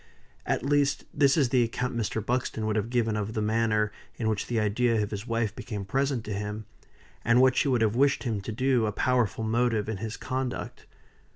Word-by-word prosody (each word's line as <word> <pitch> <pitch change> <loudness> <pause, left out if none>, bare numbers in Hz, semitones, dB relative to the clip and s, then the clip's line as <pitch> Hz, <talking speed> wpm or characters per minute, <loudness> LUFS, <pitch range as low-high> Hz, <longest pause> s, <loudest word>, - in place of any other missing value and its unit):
At - - 0
least, 145 -1 +2
this 140 0 +4
is 140 -5 +3
the 125 0 +3
account 125 +2 -1
Mr. 110 -2 -2
Buxton 120 -3 -1
would 110 0 0
have 110 +1 -1
given 115 -3 +1
of 105 +1 -3
the 110 - -2
manner 110 -1 +1 0.2
in 115 - -2
which 110 -2 -1
the 120 -2 0
idea 115 +2 +2
of 105 - -5
his 105 +2 -5
wife 115 -3 -1
became 105 -5 -5
present 135 +2 0
to 105 - -4
him, 105 +1 -4 0.6
and 115 +2 +4
what 130 0 +5
she 140 - +2
would 125 -4 +2
have 110 0 +2
wished 140 +2 +3
him 110 -5 -2
to 105 - -5
do 125 -1 +2
a - - 0
powerful 115 -2 +1
motive 115 -1 +1
in 110 -2 -3
his 110 +2 -5
conduct. 130 -1 -4
115 Hz, 210 wpm, -27 LUFS, 105-125 Hz, 0.6 s, what